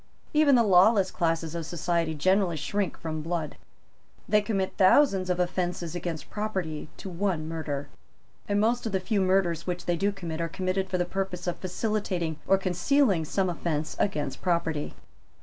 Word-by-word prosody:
Even 300 Hz, -3 st, +5 dB
the 235 Hz, -, +5 dB
lawless 195 Hz, 0 st, +5 dB
classes 165 Hz, -1 st, -1 dB
of 170 Hz, -1 st, -3 dB
society 170 Hz, 0 st, -1 dB
generally 185 Hz, +2 st, +2 dB
shrink 200 Hz, +5 st, -2 dB
from 155 Hz, -1 st, -4 dB
blood. 165 Hz, -1 st, -3 dB, 0.7 s
They 210 Hz, +1 st, +4 dB
commit 200 Hz, -3 st, -1 dB
thousands 195 Hz, -2 st, +4 dB
of 180 Hz, 0 st, 0 dB
offences 175 Hz, -2 st, -1 dB
against 175 Hz, -3 st, -5 dB
property 190 Hz, -8 st, -3 dB
to -, -, -8 dB
one 175 Hz, -3 st, -1 dB
murder; 150 Hz, -3 st, -4 dB, 0.6 s
and 205 Hz, 0 st, +2 dB
most 230 Hz, +2 st, +1 dB
of 215 Hz, -, -4 dB
the 190 Hz, -, +2 dB
few 200 Hz, +2 st, 0 dB
murders 185 Hz, -3 st, +1 dB
which 180 Hz, -1 st, -3 dB
they 175 Hz, -, +1 dB
do 200 Hz, +4 st, +1 dB
commit 170 Hz, -4 st, -5 dB
are 165 Hz, -, -1 dB
committed 185 Hz, +2 st, -2 dB
for 185 Hz, -, 0 dB
the 175 Hz, -, +1 dB
purpose 190 Hz, -1 st, -3 dB
of 175 Hz, -1 st, -2 dB
facilitating 185 Hz, -4 st, -2 dB
or 195 Hz, -, +5 dB
concealing 190 Hz, -, +2 dB
some 190 Hz, +4 st, 0 dB
offence 160 Hz, -3 st, -2 dB
against 150 Hz, -9 st, -1 dB
property. 170 Hz, -4 st, -1 dB
180 Hz, 165 wpm, -27 LUFS, 165-195 Hz, 0.7 s, Even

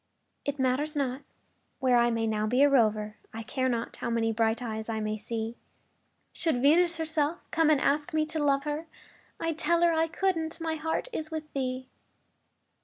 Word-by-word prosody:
It 285 Hz, 0 st, -2 dB
matters 270 Hz, +4 st, 0 dB
not 270 Hz, -1 st, -1 dB, 0.6 s
where 255 Hz, -2 st, +3 dB
I 240 Hz, 0 st, +4 dB
may 230 Hz, -1 st, 0 dB
now 215 Hz, -1 st, 0 dB
be 250 Hz, +5 st, +4 dB
a 285 Hz, -, +6 dB
rover, 215 Hz, -4 st, +2 dB, 0.2 s
I 225 Hz, -, -5 dB
care 260 Hz, +3 st, -1 dB
not 235 Hz, -2 st, -3 dB
how -, -, -3 dB
many 225 Hz, -1 st, +1 dB
bright 225 Hz, 0 st, +1 dB
eyes 220 Hz, -2 st, -5 dB
I 220 Hz, -1 st, -1 dB
may 215 Hz, 0 st, -1 dB
see; 225 Hz, +2 st, -4 dB, 0.8 s
Should 325 Hz, -7 st, 0 dB
Venus 335 Hz, +6 st, +4 dB
herself 315 Hz, 0 st, 0 dB
come 325 Hz, -1 st, +3 dB
and 300 Hz, -3 st, +4 dB
ask 295 Hz, +5 st, +1 dB
me 310 Hz, -1 st, +1 dB
to 315 Hz, 0 st, -2 dB
love 275 Hz, -1 st, +2 dB
her, 300 Hz, +2 st, -3 dB, 0.5 s
I'd 330 Hz, -1 st, -2 dB
tell 340 Hz, +2 st, +3 dB
her 340 Hz, -1 st, +5 dB
I 325 Hz, 0 st, +2 dB
couldn't 330 Hz, -2 st, -1 dB
my 325 Hz, -1 st, -1 dB
heart 320 Hz, +7 st, -2 dB
is 310 Hz, -6 st, -2 dB
with 315 Hz, -1 st, -6 dB
thee. 255 Hz, -1 st, -2 dB
280 Hz, 185 wpm, -28 LUFS, 230-320 Hz, 0.8 s, a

